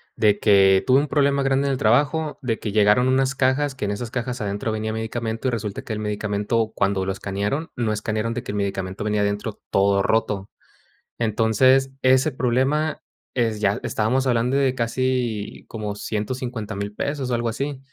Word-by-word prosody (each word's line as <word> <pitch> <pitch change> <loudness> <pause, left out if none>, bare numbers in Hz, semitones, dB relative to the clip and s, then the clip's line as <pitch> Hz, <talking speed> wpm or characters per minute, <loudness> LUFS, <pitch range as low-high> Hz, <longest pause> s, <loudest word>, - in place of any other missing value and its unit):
de 105 -1 +3
que 95 -2 +5
tuve 130 +1 +5
un 145 - -1
problema 140 -1 +2
grande 135 +1 +1
en - - +1
el 130 - -1
trabajo, 145 +7 +2
de 115 -3 -1
que 105 - -4
llegaron 105 +4 +4
unas 130 +1 +2
cajas, 135 +1 +1
que 125 - -4
en 100 - -1
esas 115 +3 -5
cajas 125 0 -3
adentro 105 +2 -2
venía 110 0 -2
medicamento 110 +2 -3
y - - +1
resulta 105 -3 -3
que - - -5
el 105 - -3
medicamento, 105 +1 -1
cuando 100 -1 +1
lo - - +1
escanearon, 100 +10 -3
no 115 -3 0
escanearon 110 +2 -2
de 125 - -3
que 125 - -5
el - - -5
medicamento 95 -1 -3
venía 105 -1 0
adentro 100 +1 -2
todo 100 0 +3
roto. 105 -3 0 0.7
Entonces, 120 +4 +3
ese 130 +3 +4
problema 135 +5 0 0.3
es 115 -4 0
ya 100 0 +2
estábamos 125 +5 0
hablando 125 +2 +1
de 135 -2 +2
casi 120 -3 -2
como 105 -2 -4
150,000 105 -2 -4
pesos, 140 -3 -2
o 125 - +1
algo 120 0 -1
así. 135 +4 -3
115 Hz, 180 wpm, -23 LUFS, 105-130 Hz, 0.7 s, que